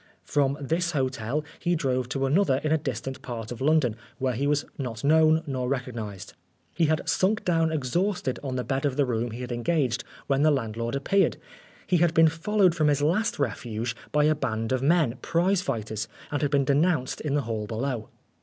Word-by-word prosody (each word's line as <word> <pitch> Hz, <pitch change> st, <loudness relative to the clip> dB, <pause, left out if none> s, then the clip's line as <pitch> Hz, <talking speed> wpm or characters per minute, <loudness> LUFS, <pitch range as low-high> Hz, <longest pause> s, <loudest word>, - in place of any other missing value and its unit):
From 140 Hz, -1 st, +1 dB
this 170 Hz, +5 st, -1 dB
hotel 130 Hz, +1 st, -1 dB
he 175 Hz, -1 st, +1 dB
drove 130 Hz, -5 st, -1 dB
to 135 Hz, 0 st, -1 dB
another 145 Hz, 0 st, +3 dB
in 155 Hz, -, 0 dB
a 160 Hz, -, +4 dB
distant 135 Hz, -2 st, -4 dB
part 115 Hz, -2 st, -6 dB
of 120 Hz, -, -7 dB
London, 140 Hz, -6 st, +3 dB, 0.2 s
where 130 Hz, -2 st, 0 dB
he 135 Hz, +5 st, -1 dB
was 145 Hz, 0 st, +1 dB
not 120 Hz, -5 st, -4 dB
known 160 Hz, +2 st, +4 dB
nor 130 Hz, -4 st, -2 dB
recognised. 115 Hz, -7 st, -4 dB, 0.4 s
He 165 Hz, -, +2 dB
had 155 Hz, 0 st, 0 dB
sunk 200 Hz, +3 st, +1 dB
down 165 Hz, -2 st, +2 dB
exhausted 160 Hz, +1 st, -1 dB
on 135 Hz, -3 st, -4 dB
the 125 Hz, -, -1 dB
bed 135 Hz, +1 st, -2 dB
of 140 Hz, -2 st, 0 dB
the 145 Hz, -, +3 dB
room 120 Hz, -1 st, -1 dB
he 115 Hz, +3 st, -7 dB
had 125 Hz, 0 st, -5 dB
engaged 125 Hz, +1 st, 0 dB, 0.2 s
when 135 Hz, 0 st, +1 dB
the 155 Hz, -, +5 dB
landlord 115 Hz, -3 st, -1 dB
appeared. 195 Hz, +8 st, +2 dB, 0.5 s
He 180 Hz, -, +2 dB
had 170 Hz, 0 st, +2 dB
been 160 Hz, 0 st, +7 dB
followed 185 Hz, +3 st, +2 dB
from 155 Hz, -3 st, +1 dB
his 145 Hz, -1 st, +2 dB
last 185 Hz, +9 st, +1 dB
refuge 115 Hz, -3 st, -2 dB, 0.2 s
by 150 Hz, 0 st, +3 dB
a 155 Hz, +1 st, +4 dB
band 115 Hz, -6 st, -2 dB
of 130 Hz, -1 st, +1 dB
men, 140 Hz, -4 st, +2 dB
prize 175 Hz, +3 st, +2 dB
fighters, 110 Hz, -, -3 dB, 0.2 s
and 145 Hz, -2 st, -1 dB
had 145 Hz, -, +1 dB
been 140 Hz, -1 st, +2 dB
denounced 145 Hz, -1 st, +1 dB
in 145 Hz, -2 st, -1 dB
the 145 Hz, -, +2 dB
hall 110 Hz, -4 st, -3 dB
below. 115 Hz, 0 st, -3 dB
140 Hz, 200 wpm, -26 LUFS, 125-160 Hz, 0.5 s, been